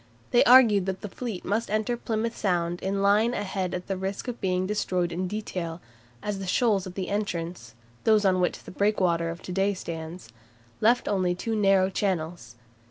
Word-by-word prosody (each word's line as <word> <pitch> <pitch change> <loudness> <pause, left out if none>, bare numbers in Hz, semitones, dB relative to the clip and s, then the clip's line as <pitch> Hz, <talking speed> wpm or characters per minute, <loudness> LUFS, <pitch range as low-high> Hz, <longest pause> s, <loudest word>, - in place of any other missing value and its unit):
They 240 - +6
argued 225 -7 +7
that 190 0 -3
the 210 - -5
fleet 225 -4 -6
must 220 +4 -1
enter 215 +3 0
Plymouth 230 -1 -2
Sound 175 -2 -1
in 195 +1 -1
line 215 +4 +3
ahead 190 -3 -2
at 180 - -5
the 195 - -2
risk 190 +5 -4
of 245 -1 -5
being 185 -1 0
destroyed 185 -3 -1
in 180 +2 -2
detail, 180 -5 -4 0.4
as 205 -2 -2
the 190 - -5
shoals 200 -2 +2
at 180 - -9
the 185 -2 -3
entrance 170 - -3 0.3
(those 215 -2 +4
on 185 -1 +3
which 180 - -1
the - - -10
breakwater 185 -5 +1
of 170 +1 -7
to - - -6
day 195 +2 +1
stands) 165 -5 -7 0.5
left 235 +3 +3
only 185 -3 +1
two 225 +5 -3
narrow 195 -2 +3
channels. 170 - -2
190 Hz, 185 wpm, -26 LUFS, 180-210 Hz, 0.5 s, argued